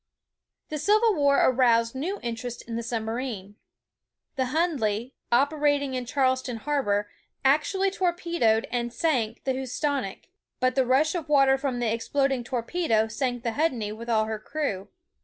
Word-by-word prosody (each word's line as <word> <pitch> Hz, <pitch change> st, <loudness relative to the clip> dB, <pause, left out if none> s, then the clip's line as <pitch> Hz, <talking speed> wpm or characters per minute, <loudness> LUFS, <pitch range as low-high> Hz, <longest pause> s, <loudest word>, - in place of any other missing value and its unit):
The 305 Hz, -, -3 dB
Civil 425 Hz, +7 st, +4 dB
War 285 Hz, -4 st, +3 dB
aroused 235 Hz, -3 st, +3 dB
new 340 Hz, +10 st, -3 dB
interest 235 Hz, +1 st, -5 dB
in 230 Hz, -, -6 dB
the 230 Hz, -, -2 dB
submarine. 225 Hz, -3 st, -4 dB, 0.8 s
The 260 Hz, -2 st, 0 dB
Hundley, 255 Hz, -7 st, 0 dB, 0.2 s
operating 285 Hz, +1 st, +2 dB
in 250 Hz, -1 st, -3 dB
Charleston 260 Hz, -2 st, 0 dB
harbor, 215 Hz, -6 st, 0 dB, 0.4 s
actually 380 Hz, +8 st, +2 dB
torpedoed 340 Hz, -, +1 dB
and 240 Hz, -1 st, -1 dB
sank 245 Hz, -6 st, -1 dB
the 265 Hz, -, 0 dB
Housatonic, 265 Hz, -3 st, -3 dB, 0.3 s
but 255 Hz, 0 st, +2 dB
the 260 Hz, -1 st, +1 dB
rush 280 Hz, +5 st, +3 dB
of 330 Hz, -4 st, -4 dB
water 275 Hz, -2 st, +5 dB
from 270 Hz, -2 st, -2 dB
the 235 Hz, -2 st, 0 dB
exploding 270 Hz, +2 st, 0 dB
torpedo 235 Hz, -1 st, 0 dB
sank 245 Hz, +1 st, -2 dB
the 235 Hz, -, 0 dB
Hundley 240 Hz, -6 st, -1 dB
with 230 Hz, +2 st, -8 dB
all 220 Hz, -2 st, +3 dB
her 220 Hz, 0 st, -4 dB
crew. 215 Hz, -6 st, -3 dB
255 Hz, 145 wpm, -26 LUFS, 230-290 Hz, 0.8 s, water